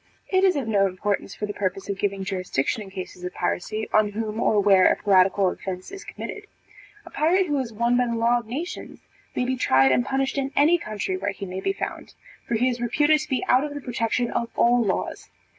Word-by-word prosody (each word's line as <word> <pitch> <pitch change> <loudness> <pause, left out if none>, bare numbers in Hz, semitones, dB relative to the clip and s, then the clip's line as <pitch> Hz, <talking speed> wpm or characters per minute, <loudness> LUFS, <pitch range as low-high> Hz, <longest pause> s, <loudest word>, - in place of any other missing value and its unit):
It 375 0 +2
is 380 -2 +4
of 275 -5 -2
no 200 -3 +3
importance, 195 +1 -3
for 210 - -3
the 205 - -5
purpose 195 -1 -3
of 200 -1 -4
giving 200 -1 -1
jurisdiction 185 -2 -2
in 200 - -9
cases 185 -1 -8
of 180 - -5
piracy, 215 +5 -2
on 210 -1 +3
whom 215 0 -3
or 215 -2 +3
where 195 -2 +5
a - - +2
piratical 190 -1 +3
offence 185 -1 -6
is 395 +1 -8
committed. 420 0 -8 0.6
A - - -12
pirate 360 +5 +2
who 295 -4 0
is 250 -3 -3
one 235 +3 +1
by 250 0 +2
the 235 - -1
law 235 +1 +2
of 235 - -12
nations, 300 +10 -6 0.3
may 250 - 0
be 260 +1 0
tried 135 - +4
and 125 -1 +3
punished 270 - -1
in 270 0 -1
any 320 +4 +4
country 205 - -3
where 200 +2 -2
he 195 - -7
may 185 0 -5
be - - 0
found; 390 - -6 0.3
for 235 - 0
he 245 +3 +2
is 245 -1 -2
reputed 295 +6 +3
to 310 - -6
be 260 - -1
out 255 +2 +4
of 295 -1 -5
the - - -4
protection 240 -2 -1
of 235 - -2
all 240 0 +4
laws. 195 -3 -3
225 Hz, 230 wpm, -24 LUFS, 195-260 Hz, 0.6 s, where